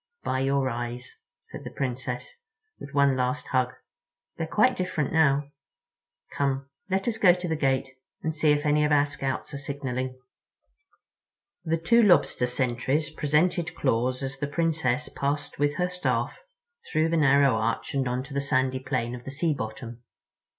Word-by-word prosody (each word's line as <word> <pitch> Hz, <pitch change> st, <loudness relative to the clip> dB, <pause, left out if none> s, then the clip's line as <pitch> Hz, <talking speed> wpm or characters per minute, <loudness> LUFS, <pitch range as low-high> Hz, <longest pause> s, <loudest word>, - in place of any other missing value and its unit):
"By 130 Hz, -, 0 dB
your 135 Hz, 0 st, +1 dB
eyes," 120 Hz, 0 st, -5 dB, 0.2 s
said -, -, -10 dB
the -, -, -6 dB
Princess, 125 Hz, -1 st, -4 dB, 0.5 s
with 140 Hz, -, -9 dB
one 140 Hz, -1 st, +4 dB
last 125 Hz, 0 st, -1 dB
hug; 125 Hz, -1 st, +1 dB, 0.6 s
"they're 165 Hz, -, -3 dB
quite 235 Hz, +9 st, +3 dB
different 160 Hz, -6 st, -2 dB
now. 145 Hz, -2 st, +3 dB, 0.8 s
Come, 135 Hz, -1 st, 0 dB, 0.2 s
let 195 Hz, +2 st, 0 dB
us 225 Hz, -2 st, -1 dB
go 180 Hz, -5 st, +6 dB
to 180 Hz, 0 st, -4 dB
the 160 Hz, -, 0 dB
gate 135 Hz, -3 st, +1 dB, 0.4 s
and 160 Hz, -, -1 dB
see 155 Hz, 0 st, +3 dB
if 145 Hz, +1 st, +1 dB
any 150 Hz, 0 st, +3 dB
of 150 Hz, -, +1 dB
our 145 Hz, -1 st, +5 dB
Scouts 145 Hz, 0 st, -4 dB
are 140 Hz, -, -4 dB
signaling." 130 Hz, -2 st, -4 dB, 1.4 s
The 165 Hz, -1 st, 0 dB
two 235 Hz, +9 st, +4 dB
Lobster 145 Hz, -, +4 dB
sentries 130 Hz, +4 st, 0 dB
presented 165 Hz, +3 st, +1 dB
claws 130 Hz, -1 st, 0 dB
as 135 Hz, 0 st, -4 dB
the 145 Hz, -, -1 dB
Princess 150 Hz, -3 st, 0 dB
passed 145 Hz, +1 st, -3 dB
with 145 Hz, 0 st, +2 dB
her 180 Hz, +3 st, 0 dB
Staff 180 Hz, 0 st, -1 dB, 0.6 s
through 155 Hz, +1 st, +2 dB
the 165 Hz, -, +1 dB
narrow 140 Hz, -2 st, +5 dB
arch 115 Hz, +7 st, -1 dB
and 135 Hz, -2 st, 0 dB
onto 130 Hz, +3 st, -3 dB
the 140 Hz, -, 0 dB
sandy 130 Hz, -1 st, +1 dB
plain 130 Hz, -3 st, -2 dB
of 125 Hz, -1 st, -7 dB
the -, -, -7 dB
sea 155 Hz, +3 st, 0 dB
bottom. 115 Hz, -1 st, -6 dB
140 Hz, 165 wpm, -26 LUFS, 130-155 Hz, 1.4 s, go